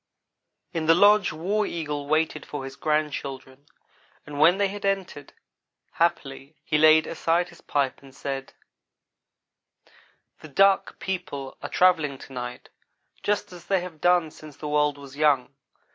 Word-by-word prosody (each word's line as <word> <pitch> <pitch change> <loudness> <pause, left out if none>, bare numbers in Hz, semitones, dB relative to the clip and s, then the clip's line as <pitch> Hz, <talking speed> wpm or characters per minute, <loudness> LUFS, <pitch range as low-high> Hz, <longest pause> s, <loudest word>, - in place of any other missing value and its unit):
In 160 -2 -2
the 165 - +7
lodge 205 +2 +5
War 190 +7 -1
Eagle 150 -4 -4
waited 155 0 0
for 145 -2 -6
his 135 0 -8
grandchildren, 145 -3 -3 0.6
and 145 -1 -7
when 170 +5 +6
they 200 0 +2
had 200 +1 -7
entered, 195 -7 -2 0.6
happily, 150 -4 -1
he 150 - +1
laid 155 0 +6
aside 170 +2 0
his 170 - -17
pipe 140 -2 -1
and 135 -1 -16
said: 135 -1 -5 1.9
"The - - -11
Duck 195 +6 +3
people 140 -8 -5
are - - -5
travelling 160 -7 +3
to 135 - -13
night 125 -1 -7 0.5
just 205 -2 -1
as 175 -1 -12
they 195 -2 +2
have 175 -4 -9
done 175 -3 +3
since 150 -2 -13
the 150 - -6
world 150 -1 +1
was 140 -1 -12
young. 140 -4 +2
155 Hz, 145 wpm, -25 LUFS, 140-175 Hz, 1.9 s, the